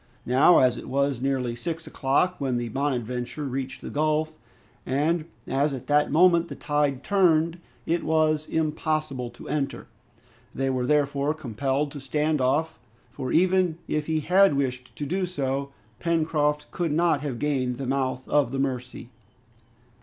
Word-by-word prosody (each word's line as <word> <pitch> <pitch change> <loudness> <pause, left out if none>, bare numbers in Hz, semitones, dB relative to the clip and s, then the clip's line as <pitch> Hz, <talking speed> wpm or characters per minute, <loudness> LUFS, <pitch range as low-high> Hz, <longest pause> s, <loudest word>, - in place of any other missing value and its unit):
Now, 130 +8 +5
as 125 -2 +4
it - - -8
was 140 -2 0
nearly 130 -3 -1
six 165 +6 -4
o'clock 150 +7 +1
when 130 -3 0
the 120 -1 -3
"Bonadventure" 125 +1 -2
reached 135 0 -4
the - - -7
gulf, 155 +1 0 0.5
and 155 +5 0 0.2
as 140 +2 +1
at 125 - -8
that 145 0 +3
moment 170 +2 +5
the - - -7
tide 145 -3 0
turned, 170 -4 +2 0.3
it 170 +1 0
was 155 -1 +1
impossible 155 -4 -1
to 120 - -12
enter. 145 -2 -2 0.7
They 135 0 0
were 125 -1 -1
therefore 145 0 +1
compelled 140 +1 -2
to 145 - -7
stand 150 +2 0
off, 150 +5 0 0.3
for 130 - -5
even 180 -1 +3
if 150 -1 -1
he 160 -1 0
had 185 +1 +4
wished 125 -2 -3
to 145 - -4
do 185 +5 -1
so, 140 -4 -2 0.3
Pencroft 155 -3 0
could 170 -4 -1
not 165 -2 +2
have 140 -5 -3
gained 130 -3 -1
the 135 - -4
mouth 130 0 -1
of 145 -5 +2
the 135 - -3
Mercy. 125 -2 -3
145 Hz, 155 wpm, -25 LUFS, 130-155 Hz, 0.7 s, Now